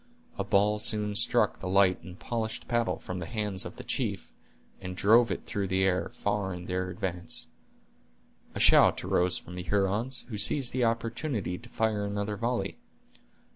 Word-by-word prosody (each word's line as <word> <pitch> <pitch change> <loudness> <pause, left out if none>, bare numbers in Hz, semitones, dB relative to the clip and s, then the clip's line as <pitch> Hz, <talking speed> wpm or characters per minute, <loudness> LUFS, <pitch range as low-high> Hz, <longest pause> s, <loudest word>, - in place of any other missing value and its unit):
A - - +1
ball 105 +2 +2
soon 105 -1 +1
struck - - +2
the 95 - -5
light 95 -1 +4
and 90 0 -11
polished 115 0 -4
paddle 120 -1 0
from 90 0 -6
the 85 - -5
hands 105 -4 -2
of - - -7
the - - -9
chief, - - -3 0.5
and 90 -1 -6
drove 115 +4 +5
it - - -4
through 100 -1 -2
the 95 0 +1
air, 95 -1 +1
far 100 -2 -2
in 90 0 -8
the 90 0 -2
advance. 90 -2 -3 1.1
A - - -3
shout - - +6
arose 90 +1 +2
from 90 - -10
the 90 - -5
Hurons, 100 +7 0
who 105 -3 -4
seized 125 +4 +3
the 125 -1 +2
opportunity 115 - -2
to - - -14
fire 110 -2 0
another 100 +1 -2
volley. 115 -2 -2
100 Hz, 175 wpm, -29 LUFS, 95-115 Hz, 1.1 s, shout